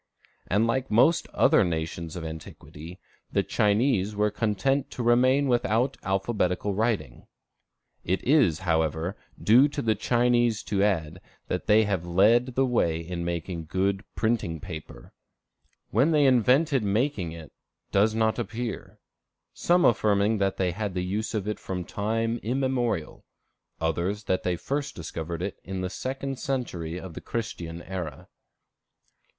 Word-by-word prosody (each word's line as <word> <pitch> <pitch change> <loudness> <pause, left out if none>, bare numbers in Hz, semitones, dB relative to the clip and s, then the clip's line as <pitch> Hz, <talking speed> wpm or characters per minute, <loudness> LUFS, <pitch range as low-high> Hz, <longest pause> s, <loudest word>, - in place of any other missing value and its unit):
And 105 +4 +2
like 130 +3 -1
most 130 +10 +4
other - - +4
nations 80 0 -3
of 85 -2 -5
antiquity, 80 +1 -9 0.3
the - - +1
Chinese 105 -1 +1
were 105 0 +1
content 115 +7 0
to 125 - -5
remain 130 +4 +4
without 120 +1 +1
alphabetical 95 0 0
writing. 105 - -2 0.8
It 95 +2 -1
is, 130 - +4
however, 80 +1 0 0.2
due 125 +7 +6
to 145 - -6
the 115 -5 +2
Chinese 120 +1 +2
to 100 -1 -1
add, 95 -4 0 0.3
that - - -3
they 110 +1 +5
led 105 +9 +2
the 135 - +3
way 85 -10 +1
in 85 +1 -5
making 85 0 -4
good 95 +4 0
printing 110 -8 0
paper. 75 -6 -9 0.8
When 130 - +3
they 150 -3 +4
invented 130 +3 +4
making 105 - 0
it, 80 -2 -10 0.4
does 105 +3 +3
not 110 +1 +1
appear, 115 0 -5 0.6
some 175 +1 +3
affirming 105 -1 +3
that 95 -1 0
they 90 -2 +1
had 100 +1 -4
the 90 0 -1
use 105 +4 -2
of 105 -2 -2
it 105 - -3
from 90 -2 -4
time 115 +4 -1
immemorial; 125 - -1 0.6
others 85 +6 -1
that 95 -2 0
they 90 -1 0
first 140 - -3
discovered 85 0 -5
it 100 - -4
in 95 0 -5
the 90 -1 -3
second 135 0 -4
century 90 - -3
of 95 -3 -9
the - - -8
Christian 85 -7 -5
era. 90 -4 -6
105 Hz, 140 wpm, -26 LUFS, 90-120 Hz, 0.8 s, due